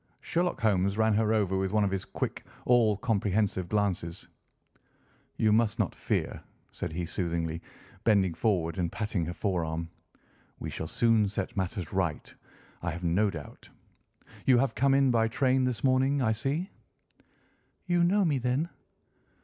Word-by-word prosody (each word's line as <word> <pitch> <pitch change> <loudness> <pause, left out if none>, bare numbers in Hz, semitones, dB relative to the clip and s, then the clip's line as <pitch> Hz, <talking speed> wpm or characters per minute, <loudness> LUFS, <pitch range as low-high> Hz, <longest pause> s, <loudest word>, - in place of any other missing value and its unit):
Sherlock 175 +1 -1
Holmes 100 -2 +2
ran 110 0 +3
her 110 +1 +2
over 100 -4 +1
with 95 0 -1
one 105 -1 +3
of 100 - +1
his 95 -1 -2
quick, - - -4 0.2
all 115 -4 +4
comprehensive 100 -4 0
glances. 95 -5 -1 1.1
"You 110 - +3
must 110 0 +2
not - - 0
fear," - - -2 0.3
said - - -5
he 85 +1 -2
soothingly, 85 -2 -2 0.4
bending 100 -5 +3
forward 85 -3 0
and 85 -2 0
patting 105 -6 -2
her 85 - -3
forearm. 85 -3 -2 0.7
"We - - -6
shall 80 - -4
soon 110 +1 +3
set 95 -1 -4
matters 95 -2 -3
right, 90 -5 -2 0.5
I 85 - -2
have 85 +2 -5
no 90 +5 +2
doubt. 80 -6 -9 0.8
You 130 -2 +6
have 120 -1 +2
come 135 +2 +3
in 135 -2 +4
by 115 -1 +3
train 130 +2 +2
this 125 -2 -2
morning, 135 +1 +3
I 115 -4 +2
see." 140 - -2 1.1
"You 175 -1 +2
know 195 +3 +3
me, 145 -5 +1
then?" 130 +7 0
105 Hz, 155 wpm, -29 LUFS, 90-125 Hz, 1.1 s, You